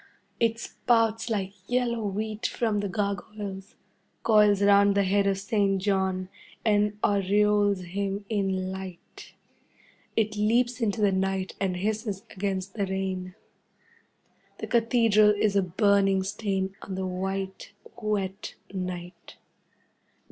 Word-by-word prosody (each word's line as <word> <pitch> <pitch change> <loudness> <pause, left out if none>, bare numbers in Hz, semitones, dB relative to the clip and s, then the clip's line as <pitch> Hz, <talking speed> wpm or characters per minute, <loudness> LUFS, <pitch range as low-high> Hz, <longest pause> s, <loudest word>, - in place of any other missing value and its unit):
It 230 -1 +2
spouts 225 -1 +1
like 195 -3 -2
yellow 245 -2 0
wheat 215 +2 -2
from 220 -3 -1
the 200 -1 -2
gargoyles, 200 0 -4 0.5
coils 210 -2 +5
round 200 0 +5
the 200 - +3
head 200 +1 +2
of 195 -1 +1
Saint 195 0 +1
John, 190 -1 0 0.4
and 210 -1 +2
aureoles 205 0 +2
him 200 +3 -3
in 190 -3 -1
light. 190 -2 -9 0.8
It 215 -1 +1
leaps 240 +4 +1
into 220 -1 0
the 205 -1 +4
night 190 0 -1
and 185 -2 -1
hisses 210 0 -2
against 190 -1 -3
the 200 -3 -1
rain. 190 -1 -3 1.2
The - - -5
Cathedral 225 -3 +4
is 205 -1 +1
a 200 - +5
burning 195 +1 +2
stain 195 -1 -2
on 190 - -6
the 190 0 -2
white, 190 +1 -4 0.3
wet 200 -2 -2 0.2
night. 180 -1 -6
200 Hz, 120 wpm, -27 LUFS, 190-210 Hz, 1.2 s, coils